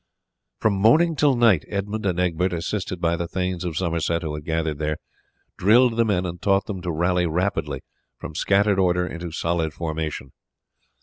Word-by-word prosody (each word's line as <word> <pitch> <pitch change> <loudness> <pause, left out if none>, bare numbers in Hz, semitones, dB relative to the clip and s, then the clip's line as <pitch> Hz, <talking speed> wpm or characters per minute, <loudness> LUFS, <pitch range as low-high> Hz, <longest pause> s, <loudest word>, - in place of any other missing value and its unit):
From 110 - +2
morning 140 - +4
till 145 -2 +3
night 115 -8 +4
Edmund 105 +1 -3
and 90 -2 0
Egbert, 90 0 0
assisted 90 +1 -3
by 85 -1 +1
the 85 0 -3
thanes 90 0 -2
of 85 -4 -3
Somerset 85 -1 -1
who 80 -2 -3
had 75 0 -6
gathered 80 -2 -1
there, 75 0 -1 0.6
drilled 115 +5 +5
the 115 0 +3
men 95 -4 0
and 90 0 -6
taught 100 0 +2
them 95 -4 -5
to 90 -1 -3
rally 90 +2 +1
rapidly 90 +5 -1 0.4
from - - -8
scattered 100 +4 +2
order 90 -1 +2
into 85 -1 -6
solid 85 -1 -1
formation. 80 -5 -4
90 Hz, 175 wpm, -23 LUFS, 85-100 Hz, 0.6 s, drilled